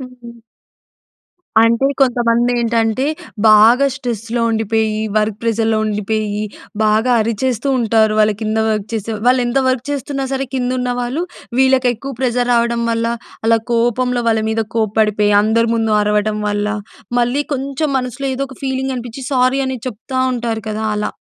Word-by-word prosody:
హుహు. 250 -2 -11 1.3
అంటే, 230 +4 +3
కొంతమంది 240 -2 +2
ఏంటంటే, 230 +1 +1 0.4
బాగా 225 +6 +6
స్ట్రెస్‌లో 235 -3 -3
ఉండిపోయి, 220 -1 0 0.2
వర్క్ 210 -1 0
ప్రెజర్‍లో 225 -1 +1
ఉండిపోయి, 210 0 -2 0.4
బాగా 215 +3 +2
అరిచేస్తుంటారు. 230 -1 +1
వాళ్ళ 215 0 +4
కింద 220 0 -1
వర్క్ 210 -1 -1
చేసే, 225 -1 -3 0.2
వాళ్ళు 250 0 +4
ఎంత 240 +3 +1
వర్క్ 255 -1 0
చేస్తున్నా 275 -1 -3
సరే, 270 0 -1
కింద 250 -1 -1
ఉన్న 250 0 -1
వాళ్ళు, 250 +7 -2 0.4
వీళ్ళకి 265 -1 +4
ఎక్కువ 270 +5 -7
ప్రెజర్ 245 -1 0
రావడం 235 0 +1
వల్ల, 230 0 0 0.4
అలా 230 0 +4
కోపంలో 240 +1 +1
వాళ్ళ 220 -1 +2
మీద 225 0 0 0.2
కోప్పడిపోయి, 210 -1 +2
అందరి 230 +2 +2
ముందు 225 -1 0
అరవడం 210 0 0
వల్ల, 205 0 -1 0.5
మళ్ళీ 245 +4 +1
కొంచెం 275 +3 -2
మనసులో 255 +2 -4
ఏదో 265 - -3
ఒక 260 - -11
ఫీలింగ్ 265 0 -2
అనిపించి, 245 +2 -7
సారీ 255 +1 +2
అని 260 -1 -3
చెప్తా 255 +3 -4
ఉంటారు 230 -2 -2
కదా! 215 +1 -3
అలా. 210 0 -2
235 Hz, 145 wpm, -17 LUFS, 220-255 Hz, 1.3 s, బాగా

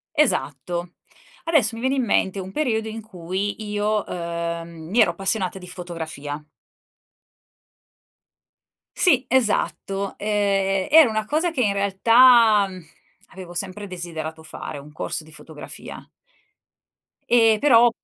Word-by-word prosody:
Esatto. 175 - -1 0.5
Adesso 270 -9 +2
mi 230 - -7
viene 260 +1 +1
in 260 - +1
mente 195 -3 +1
un 190 0 -7
periodo 220 -4 -1
in 225 +1 -6
cui 200 +1 -4
io, 210 0 0
uhm, 170 -1 -5
mi 225 +6 +1
ero 220 - +5
appassionata 195 -1 -1
di 180 - -11
fotografia. 160 -5 -6 2.6
Sì, 275 -9 +4
esatto. 205 -5 0
Ehm, 195 -2 0
era 315 -2 +8
una 215 -1 -2
cosa 320 +7 0
che 275 -6 -1
in 205 -3 +2
realtà 220 +2 +5 0.6
avevo 185 -2 -11
sempre 195 +3 -4
desiderato 160 -3 -6
fare, 155 -2 -8
un 150 +2 -13
corso 155 - -4
di 155 - -17
fotografia. 155 0 -10 1.2
Ehm, 225 -3 +5
però 240 -4 +6
200 Hz, 120 wpm, -23 LUFS, 175-225 Hz, 2.6 s, era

